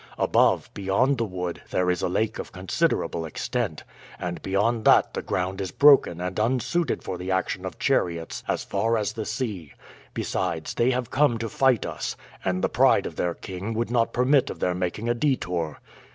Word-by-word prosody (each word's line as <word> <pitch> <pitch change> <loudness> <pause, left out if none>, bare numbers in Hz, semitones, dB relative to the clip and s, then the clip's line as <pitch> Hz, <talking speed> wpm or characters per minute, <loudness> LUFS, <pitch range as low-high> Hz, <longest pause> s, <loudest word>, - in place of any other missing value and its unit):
Above, - - +3
beyond 105 +7 +1
the 115 - +1
wood, 90 -3 -4
there 90 0 +1
is 90 - -2
a - - 0
lake 110 +4 -1
of - - -6
considerable 90 -2 -1
extent, 80 - -3 0.3
and 85 -1 -4
beyond 110 +4 0
that - - +5
the - - -3
ground 95 +3 -2
is 95 - -3
broken 140 - +5
and 90 +2 -3
unsuited 130 +9 0
for 95 -2 -5
the 90 +1 -5
action 95 -1 -1
of - - -8
chariots 85 -2 0
as - - -1
far 115 0 0
as 105 0 -1
the 110 -1 -4
sea. 110 - -4 0.4
Besides, 80 -1 -2
they 120 - +2
have 125 -2 -1
come 135 -4 +3
to 115 0 -3
fight 130 -1 +2
us, - - -4 0.3
and 95 0 -1
the - - +4
pride - - +3
of - - -5
their 85 -1 -1
king 95 +4 -6
would 115 +1 -1
not 115 -2 +2
permit 130 +2 +3
of - - -6
their 90 - +1
making 90 +5 -3
a 120 - +3
detour. 90 - -1
100 Hz, 190 wpm, -25 LUFS, 90-120 Hz, 0.4 s, that